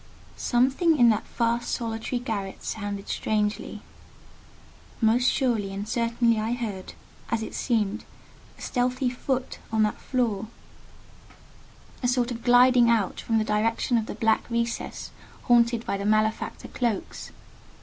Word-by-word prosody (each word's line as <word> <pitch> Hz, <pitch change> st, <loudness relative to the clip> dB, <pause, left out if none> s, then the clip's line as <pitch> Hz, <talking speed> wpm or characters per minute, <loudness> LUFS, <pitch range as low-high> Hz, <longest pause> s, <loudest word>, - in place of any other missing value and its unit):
Something 270 Hz, +7 st, +2 dB
in 240 Hz, -3 st, +6 dB
that 215 Hz, -, 0 dB
vast 235 Hz, 0 st, +1 dB
solitary 225 Hz, +1 st, -2 dB
garret 210 Hz, -6 st, -4 dB
sounded 205 Hz, -2 st, -4 dB
strangely. 210 Hz, 0 st, -2 dB, 1.2 s
Most 235 Hz, +2 st, +3 dB
surely 225 Hz, -7 st, 0 dB
and 200 Hz, +2 st, -5 dB
certainly 230 Hz, 0 st, +1 dB
I 220 Hz, +2 st, -1 dB
heard, 215 Hz, -6 st, -5 dB, 0.4 s
as 225 Hz, -1 st, 0 dB
it -, -, -7 dB
seemed, 220 Hz, -3 st, -1 dB, 0.5 s
a -, -, -15 dB
stealthy 250 Hz, 0 st, 0 dB
foot 260 Hz, +1 st, -3 dB
on 220 Hz, -1 st, +3 dB
that 210 Hz, -, -1 dB
floor: 225 Hz, -5 st, -1 dB, 1.5 s
a 250 Hz, -, +1 dB
sort 245 Hz, 0 st, +1 dB
of 235 Hz, -1 st, -5 dB
gliding 245 Hz, 0 st, +6 dB
out 220 Hz, -5 st, +1 dB
from 225 Hz, -, 0 dB
the 220 Hz, -, +2 dB
direction 220 Hz, +3 st, 0 dB
of 225 Hz, -1 st, +1 dB
the -, -, -5 dB
black 225 Hz, +1 st, +1 dB
recess 235 Hz, 0 st, -3 dB, 0.3 s
haunted 235 Hz, -1 st, +3 dB
by 200 Hz, -, -1 dB
the 200 Hz, -, -3 dB
malefactor 215 Hz, +1 st, 0 dB
cloaks. 235 Hz, -5 st, -3 dB
230 Hz, 135 wpm, -26 LUFS, 215-245 Hz, 1.5 s, in